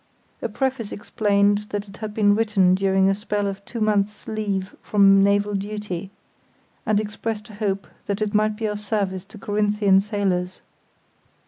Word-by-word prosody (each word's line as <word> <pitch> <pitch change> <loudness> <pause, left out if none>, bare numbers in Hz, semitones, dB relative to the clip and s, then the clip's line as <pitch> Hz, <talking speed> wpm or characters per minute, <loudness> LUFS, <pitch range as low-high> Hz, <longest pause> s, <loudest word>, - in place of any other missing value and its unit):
A - - -2
preface 265 -5 -2
explained 205 0 +1
that 205 0 -3
it 195 0 -13
had 215 -1 -5
been 205 -1 +3
written 205 -4 +3
during 190 0 +3
a 195 - +4
spell 205 0 -2
of 195 0 -4
two 235 - -6
months' 210 -1 0
leave 205 -3 -2
from 195 -1 +5
naval 205 +1 +2
duty, 200 -2 -4 0.8
and 210 -1 +3
expressed 215 +1 -4
a - - -13
hope 200 -2 -2 0.2
that 200 0 -1
it 215 -1 -1
might 215 0 +2
be 220 +1 -4
of 210 -1 -2
service 200 -3 -2
to 215 - -14
Corinthian 205 -1 +2
sailors. 195 -3 -1
205 Hz, 160 wpm, -23 LUFS, 195-210 Hz, 0.8 s, from